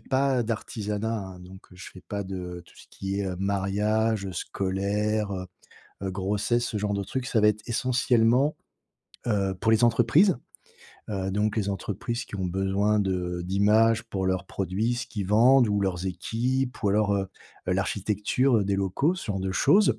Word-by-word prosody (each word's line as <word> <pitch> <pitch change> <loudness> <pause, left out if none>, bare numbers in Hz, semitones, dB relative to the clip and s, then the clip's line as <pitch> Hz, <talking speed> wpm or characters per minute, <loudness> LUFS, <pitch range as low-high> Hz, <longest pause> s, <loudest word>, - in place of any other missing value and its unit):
pas 135 -1 +1
d'artisanat, 110 -1 -3
hein, 95 -2 -8
donc 95 +1 -12
je 90 +2 -10
fais 90 - -12
pas 100 -1 -3
de 90 -2 -6
tout - - -20
ce - - -15
qui 100 +1 -3
est 95 - -1
mariage, 100 +2 0
scolaire, 100 +4 -1
heu, 95 -1 -4 0.6
heu, 95 - -2
grossesse, 105 +5 0
ce 110 - -3
genre 105 0 -1
de 100 0 -1
trucs. 130 +6 -4
Ça 120 -4 +1
va 105 - +6
être, 105 0 -2
essentiellement, 125 +2 +2 0.7
heu, 100 -4 +1
pour 110 0 +2
les 110 +1 +4
entreprises. 120 - +4 0.7
Heu, 95 -1 -2
donc, 105 +3 0
les 100 -2 0
entreprises 105 +5 -3
qui - - -7
ont 95 - -2
besoin 95 +3 +1
de 90 -2 -1
d'images 105 +4 +3
pour 95 -5 -3
leurs 95 -1 0
produits, 100 +7 -1
ce 120 0 -4
qu'ils 100 -5 -4
vendent 120 +4 +5
ou 105 -1 +1
leurs 95 -1 -1
équipes 125 +8 -2
ou 105 - +2
alors, 105 0 +2
heu, 95 -1 -2 0.4
l'architecture 105 +5 +1
des 100 0 0
locaux, 100 - +1
ce 185 - -7
genre 100 -3 -2
de 95 0 -2
choses. 200 - +4
105 Hz, 170 wpm, -26 LUFS, 95-115 Hz, 0.7 s, va